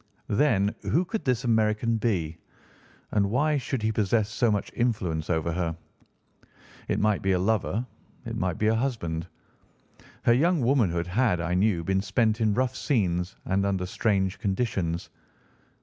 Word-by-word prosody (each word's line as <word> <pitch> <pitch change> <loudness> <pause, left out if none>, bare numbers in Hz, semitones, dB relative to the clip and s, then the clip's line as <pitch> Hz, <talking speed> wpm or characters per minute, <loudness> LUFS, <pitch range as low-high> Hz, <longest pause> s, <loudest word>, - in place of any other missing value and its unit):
Then 105 -5 +3
who 175 +4 +1
could 220 +4 -4
this 125 -1 +1
American 110 0 +2
be, 85 -8 -1 0.7
and 100 -2 +2
why 145 +6 +2
should 130 -3 -3
he 110 - +2
possess 110 0 +1
so 120 +1 +2
much 105 -2 -1
influence 95 -10 -1
over 80 -1 0
her? 85 -1 -2 1.1
It - - 0
might 105 -1 +2
be 95 0 +1
a - - +2
lover; 110 +4 0 0.4
it - - -4
might 90 -3 -1
be 105 - 0
a 110 - +4
husband. 110 -10 -2 1.0
Her 120 - +5
young 165 +5 +3
womanhood 110 -10 +2
had, 100 +1 +1
I 85 +1 -1
knew, 90 -2 +2
been 95 +2 +1
spent 110 +1 +1
in 105 -2 +2
rough 130 +1 0
scenes 95 - 0
and 95 +1 +1
under 95 -2 0
strange 95 0 0
conditions. 95 -6 -2
105 Hz, 155 wpm, -27 LUFS, 90-120 Hz, 1.1 s, Her